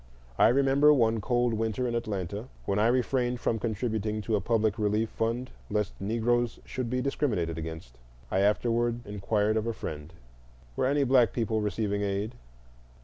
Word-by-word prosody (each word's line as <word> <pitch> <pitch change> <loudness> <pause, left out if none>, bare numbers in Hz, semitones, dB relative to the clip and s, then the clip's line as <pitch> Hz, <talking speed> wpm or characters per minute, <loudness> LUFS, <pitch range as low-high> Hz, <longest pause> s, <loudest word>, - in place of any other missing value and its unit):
I - - +7
remember, 140 +3 +5
one 115 -5 +3
cold 120 +1 +1
winter, 110 +3 -1
in 120 - -2
Atlanta, 105 -1 -3 0.2
when 100 +1 0
I 110 - +4
refrained 125 0 +1
from 115 - 0
contributing 110 -1 -2
to 110 +2 0
a 100 - 0
public 110 0 +1
relief 105 +1 +1
fund 115 +3 -2 0.2
lest 105 -2 -1
Negroes 115 +3 0
should 130 -3 -4
be 125 +1 0
discriminated 100 - -1
against, 80 -7 -8 0.3
I 95 - +2
afterward 120 +3 +1
inquired 105 +1 0
of 110 +1 -1
a 115 - -1
friend: 75 -6 -6 0.6
"Were - - +1
any 140 +1 +2
black 125 -5 +4
people 110 -2 0
receiving 105 0 -1
aid?" 100 +3 -2
110 Hz, 160 wpm, -28 LUFS, 105-120 Hz, 0.6 s, I